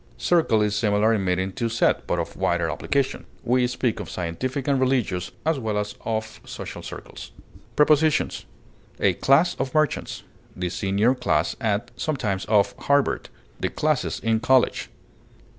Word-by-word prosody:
Circle 160 -11 +3
is 105 0 0
similar 105 +1 +2
in 105 -3 0
meaning 95 +1 0
to 115 +4 -2
set, 115 +1 +1
but - - 0
of - - -4
wider - - 0
application; 140 -1 -1 0.2
we 125 +1 +2
speak 125 -2 -1
of 100 - -6
scientific 125 - -3
and 140 -2 +2
religious 120 -9 0 0.2
as 160 -3 +1
well 110 -3 -2
as 105 0 -2
of 110 -1 -3
social - - -7
circles. - - -9 0.5
Prepositions: 150 +1 +3 0.5
A - - +3
class 160 +6 +3
of 135 +1 -3
merchants; 155 -3 0 0.3
the 90 -1 -2
senior 100 +6 +2
class 125 -1 0
at 110 +1 -1
(sometimes 105 -11 -2
of) 100 -2 +3
Harvard; 140 -1 +1 0.3
the - - -1
classes 155 -3 0
in 115 -1 +1
college. 130 +2 +2
115 Hz, 150 wpm, -24 LUFS, 105-135 Hz, 0.5 s, Circle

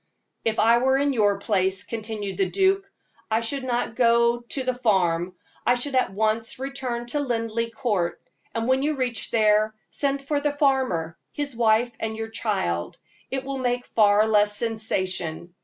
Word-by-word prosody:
"If 225 -1 0
I 230 +2 +5
were 265 +2 +3
in 280 0 +1
your 205 -4 +2
place," 190 -2 +1
continued 215 -3 -5
the 390 - +1
duke, 390 0 +1 0.4
"I 220 +1 +2
should 265 +4 -1
not 245 -2 -1
go 235 0 +3
to 240 +3 -5
the 255 0 0
farm; 185 -7 +1 0.3
I 245 - +3
should 270 +3 -2
at 255 -6 +2
once 220 +2 0
return 260 -3 -4
to 265 +5 0
Linleigh 230 -3 -1
Court; 210 -6 -1 0.4
and 230 0 -1
when 260 +1 +3
you 300 +2 0
reach 250 -3 -1
there, 215 -1 +3 0.2
send 275 -1 -1
for 290 -1 +1
the 295 0 0
farmer, 260 - 0
his 285 -3 -3
wife, 230 +1 +3
and 220 0 -3
your 225 0 -4
child 190 - -2 0.3
it 265 0 -3
will 275 0 -4
make 245 -1 -1
far 210 0 +4
less 210 -1 +3
sensation. 185 -7 -3
230 Hz, 170 wpm, -24 LUFS, 210-260 Hz, 0.4 s, I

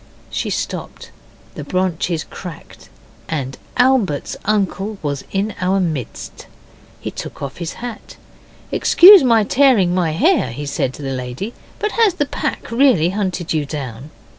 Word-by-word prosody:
She - - -2
stopped. - - -5 0.4
The - - -7
branches 180 -3 -1
cracked, 175 -5 -11 0.4
and 135 -4 -3 0.2
Albert's 250 - +2
uncle 205 0 -1
was 145 -2 -2
in 200 +2 -1
our 190 +2 +2
midst. 155 - -4 0.5
He - - -5
took - - -8
off 140 -1 -6
his 170 -2 -5
hat. 240 -2 -8 0.5
'Excuse 380 0 +8
my 230 -4 +4
tearing 225 -7 +4
my 175 -4 +1
hair,' 305 - +2
he 145 +4 -5
said 135 -2 -2
to 150 - -9
the 135 -1 -3
lady, 130 - -5 0.2
'but 425 - -1
has 440 -6 +3
the 290 - 0
pack 275 - -4
really 230 - +4
hunted 185 -4 -2
you 155 -2 +1
down? 140 -2 -6
185 Hz, 145 wpm, -19 LUFS, 150-230 Hz, 0.5 s, Excuse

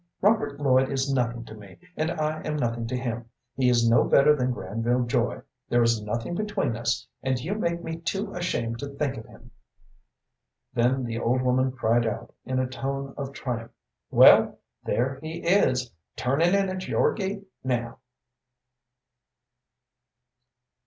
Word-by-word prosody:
Robert 205 -9 +2
Lloyd 130 -2 +3
is 135 0 0
nothing 120 -2 -1
to 110 - -10
me, 100 -3 -13 0.2
and 155 +1 0
I 155 -2 -2
am 155 - -3
nothing 115 -4 -1
to 125 +2 -2
him. 120 -2 -4 0.3
He 130 -2 +3
is 120 -1 +3
no 115 0 +5
better 150 +2 +5
than 130 -2 0
Granville 115 +4 -1
Joy. 120 0 0 0.3
There 120 0 +4
is 115 -2 +2
nothing 115 +8 -3
between 190 - -1
us, 120 0 -1 0.2
and 130 -1 0
you 160 +11 -3
make 170 -5 -2
me 165 0 -4
too 195 +5 -3
ashamed 115 -10 -2
to 140 - -4
think 140 -1 -2
of 110 - -9
him." - - -16 1.2
Then 125 +3 +2
the 115 -1 -3
old 125 +2 +1
woman 130 +1 +2
cried 120 -2 +1
out, 115 +1 -5
in 130 +1 -2
a 130 - +2
tone 135 +1 -4
of 140 -1 -5
triumph, 120 -4 -5 0.4
"Well, - - +7 0.3
there 130 +2 -1
he 160 +2 -6
is, 130 -10 +3 0.2
turnin' 160 +9 +2
in 195 -1 +2
at 185 0 -4
your - - +2
gate 200 0 -4 0.2
now." 120 -2 -2
130 Hz, 160 wpm, -26 LUFS, 120-155 Hz, 1.2 s, Well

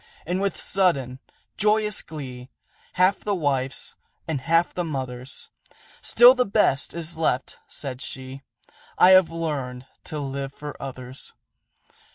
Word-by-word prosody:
And 180 +3 -1
with 200 -1 -1
sudden, 140 -10 0 0.4
joyous 210 0 +2
glee, 130 -5 -8 0.4
Half 185 +2 +3
the 205 -1 -1
wife's 135 -5 -2 0.3
and 155 -5 -2
half 165 +4 +2
the 180 - -1
mother's, 130 -4 -5 0.5
"Still 245 +1 +8
the 250 -1 +2
best 195 - +1
is 170 -1 -3
left," 135 -5 0
said 130 -3 -7
she: 130 +1 -6 0.6
"I 185 - +7
have 185 -3 +7
learned 140 -7 -4 0.2
to 155 - -4
live 140 -1 -4
for 150 0 -7
others." 130 -1 -8
150 Hz, 130 wpm, -24 LUFS, 130-180 Hz, 0.6 s, Still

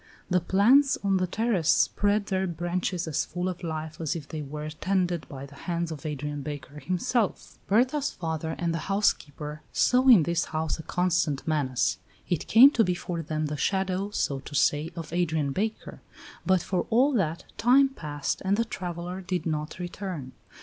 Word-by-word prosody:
The 180 - +4
plants 235 - +4
on 195 -1 +2
the 185 0 0
terrace 200 -4 0
spread 205 0 +3
their 190 -1 -1
branches 175 +1 -2
as 155 - 0
full 180 +2 -4
of 185 -1 -4
life 160 -1 -5
as 160 +1 -1
if 155 -4 -6
they 155 - -5
were 150 +1 -6
tended 180 0 -1
by 135 -1 -7
the 140 - -14
hands 170 +3 -3
of 155 0 -6
Adrian 150 0 -4
Baker 145 0 -7
himself. 190 - -1
Berta's 260 +7 +2
father 160 -1 -4
and 170 -1 -1
the 165 +3 -4
housekeeper 150 -7 -1
saw 255 +1 +3
in 225 -10 +8
this 170 +1 0
house 160 0 -2
a - - -3
constant 170 -5 0
menace; 140 -5 0 0.3
it 175 - -1
came 255 +6 +8
to 230 - +3
be 180 -3 0
for 175 -1 -4
them 155 0 -2
the 150 0 -3
shadow, 190 +3 0
so 140 -9 -1
to 140 +2 -9
say, 150 +3 +2
of 165 -1 -7
Adrian 160 -5 0
Baker; 215 +8 -3 0.5
but 185 -2 +3
for 185 -2 -1
all 260 +6 +4
that, 170 -6 0 0.2
time 260 +4 +6
passed 150 - -4
and 195 +1 +2
the 230 - +1
traveller 180 -2 -5
did 180 -1 -3
not 155 -1 -3
return. 175 -6 -5
175 Hz, 180 wpm, -27 LUFS, 155-195 Hz, 0.5 s, in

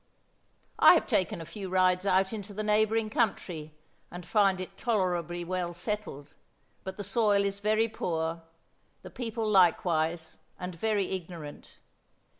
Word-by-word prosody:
"I - - +9
have - - +1
taken 175 -2 0
a - - -7
few 190 +3 -7
rides 185 +1 +2
out 190 +2 +2
into 205 -2 -7
the 215 - -3
neighboring 215 +1 +2
country, 165 -9 -2 0.3
and 175 0 -9
find 195 -3 +3
it 185 - -7
tolerably 175 -6 -1
well 175 -1 -3
settled, 175 -7 -5 0.5
but 190 0 -7
the 205 - -4
soil 205 0 +2
is 200 0 -2
very 215 +2 +2
poor, 165 -6 -3 0.6
the - - -10
people 225 -3 -3
likewise 170 -4 +2 0.2
and 180 0 -5
very 205 +2 -1
ignorant. 170 -5 -7
190 Hz, 140 wpm, -29 LUFS, 175-210 Hz, 0.6 s, I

